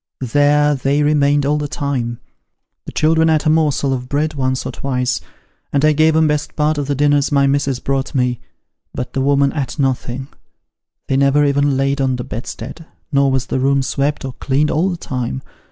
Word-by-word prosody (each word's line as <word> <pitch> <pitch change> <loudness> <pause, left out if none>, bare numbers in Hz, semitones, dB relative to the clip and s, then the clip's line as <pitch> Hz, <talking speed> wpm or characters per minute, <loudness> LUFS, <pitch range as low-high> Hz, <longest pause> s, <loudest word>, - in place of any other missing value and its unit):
There 145 0 +4
they 140 +2 +1
remained 145 -1 +2
all 150 +1 +1
the 150 - -2
time: 130 -5 -3 0.7
the - - -5
children 160 +1 +2
ate 155 -1 +2
a 155 - +4
morsel 150 -3 +1
of 125 -1 -5
bread 155 +2 0
once 130 -2 -1
or - - -3
twice, 125 -2 -2 0.5
and 140 +1 +2
I 155 - +5
gave 155 +1 +3
'em 160 0 +4
best 150 -1 -2
part 150 0 +1
of 140 - -3
the 145 - 0
dinners 145 +1 +2
my 140 -1 +3
missis 140 -2 0
brought 135 +1 -2
me, 125 -2 +1 0.6
but 125 - -5
the 135 - -1
woman 140 0 +2
ate 140 0 -3
nothing; 130 -1 -2 0.8
they 135 - +1
never 140 +2 +3
even 140 -1 +2
laid 135 +1 0
on 130 -1 +1
the 125 - -4
bedstead, 125 +7 -7 0.2
nor 140 -1 +3
was 130 -1 0
the - - -2
room 135 +1 +2
swept 140 +2 -1
or 130 - -5
cleaned 140 +4 0
all 170 +5 +1
the 175 - -3
time. 125 - -4
140 Hz, 195 wpm, -18 LUFS, 130-150 Hz, 0.8 s, I